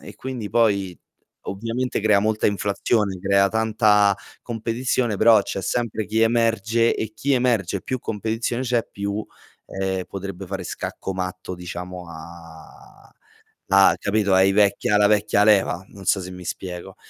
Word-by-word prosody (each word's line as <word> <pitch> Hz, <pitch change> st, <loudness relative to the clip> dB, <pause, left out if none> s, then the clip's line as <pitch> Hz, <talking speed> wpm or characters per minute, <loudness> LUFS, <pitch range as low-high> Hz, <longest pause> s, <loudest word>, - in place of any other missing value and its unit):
e -, -, -11 dB
quindi 125 Hz, -5 st, -5 dB
poi 100 Hz, -6 st, +1 dB, 0.5 s
ovviamente 115 Hz, +5 st, -3 dB
crea 105 Hz, -1 st, +4 dB
molta 110 Hz, +1 st, +1 dB
inflazione, 100 Hz, 0 st, 0 dB
crea 100 Hz, +1 st, +3 dB
tanta 105 Hz, -3 st, +3 dB, 0.2 s
competizione, 115 Hz, -1 st, -2 dB
però 110 Hz, -1 st, +6 dB
c'è 95 Hz, -, -4 dB
sempre 110 Hz, 0 st, -2 dB
chi 110 Hz, +1 st, 0 dB
emerge 115 Hz, 0 st, +2 dB
e 110 Hz, -1 st, -4 dB
chi 120 Hz, +6 st, -1 dB
emerge, 115 Hz, -7 st, 0 dB
più 130 Hz, -, -3 dB
competizione 115 Hz, +2 st, -3 dB
c'è, 120 Hz, -2 st, 0 dB
più, 100 Hz, +1 st, -3 dB, 0.4 s
ehm, 95 Hz, -1 st, -3 dB
potrebbe 95 Hz, -1 st, -7 dB
fare 95 Hz, 0 st, -5 dB
scacco 95 Hz, -, -5 dB
matto, 90 Hz, 0 st, -5 dB
diciamo, 90 Hz, 0 st, -7 dB
a 85 Hz, 0 st, -13 dB, 0.6 s
a 95 Hz, 0 st, +6 dB
capito, 100 Hz, -1 st, +1 dB
ai 95 Hz, +1 st, +5 dB
vecchi 100 Hz, 0 st, +2 dB
alla 105 Hz, 0 st, +5 dB
vecchia 105 Hz, 0 st, +3 dB
leva, 100 Hz, -4 st, +3 dB
non 100 Hz, -1 st, -13 dB
so 95 Hz, -, +2 dB
se 90 Hz, 0 st, -7 dB
mi 90 Hz, -1 st, -10 dB
spiego. 90 Hz, +1 st, -6 dB
100 Hz, 145 wpm, -22 LUFS, 95-110 Hz, 0.6 s, però